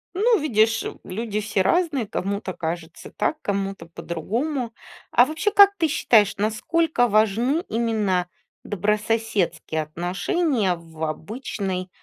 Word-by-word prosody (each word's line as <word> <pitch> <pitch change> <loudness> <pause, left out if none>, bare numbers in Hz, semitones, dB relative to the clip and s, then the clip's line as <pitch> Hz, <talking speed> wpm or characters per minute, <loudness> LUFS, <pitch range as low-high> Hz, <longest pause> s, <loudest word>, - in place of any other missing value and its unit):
Ну, 445 +4 +3
видишь, 225 -6 +2
м, - - -6
люди 210 +2 -3
все 205 -2 0
разные, 290 - +1
кому-то 200 0 -3
кажется 165 0 -6
так, - - -1
кому-то 195 -3 -3
по-другому. 230 - -3 0.4
А 245 - +6
вообще, 320 +9 -1
как 400 0 +7
ты 325 -2 +2
считаешь, 215 -7 +3
насколько 245 +6 +1
важны 225 - +2
именно 215 -6 0 0.4
добрососедские 205 -6 -1
отношения 185 - 0
в 165 -1 -10
обычной 185 - -4
215 Hz, 115 wpm, -23 LUFS, 185-255 Hz, 0.4 s, как